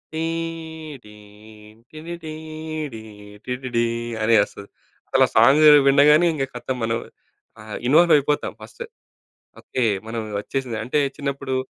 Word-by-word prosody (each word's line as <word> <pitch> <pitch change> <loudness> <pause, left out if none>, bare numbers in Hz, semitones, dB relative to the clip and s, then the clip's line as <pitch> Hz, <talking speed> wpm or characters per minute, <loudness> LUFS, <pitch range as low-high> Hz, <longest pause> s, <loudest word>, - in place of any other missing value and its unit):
TD 160 -6 -6 0.8
TTD 160 0 -8 1.1
TTD 125 -2 -2 0.4
అని 115 +1 +3
ఒస్తది. 100 0 -11 0.4
అసలు - - +4
సాంగు 140 +7 +6 0.2
వినగాన్నే 150 +4 +5
ఇంగా 135 -3 -2
ఖతం 125 +1 -4
మనం 115 0 0 0.6
ఆహ్, 110 0 -7
ఇన్వాల్వ్ 170 +5 +5
అయిపోతాం 145 +1 -1
ఫస్టు. 480 0 -9 0.8
ఓకే. 130 - -3 0.2
మనం 115 0 -4 0.2
వచ్చేసింది. 120 +2 -4
అంటే 130 +5 0 0.2
చిన్నప్పుడు 140 -2 -4
140 Hz, 105 wpm, -22 LUFS, 120-160 Hz, 1.1 s, సాంగు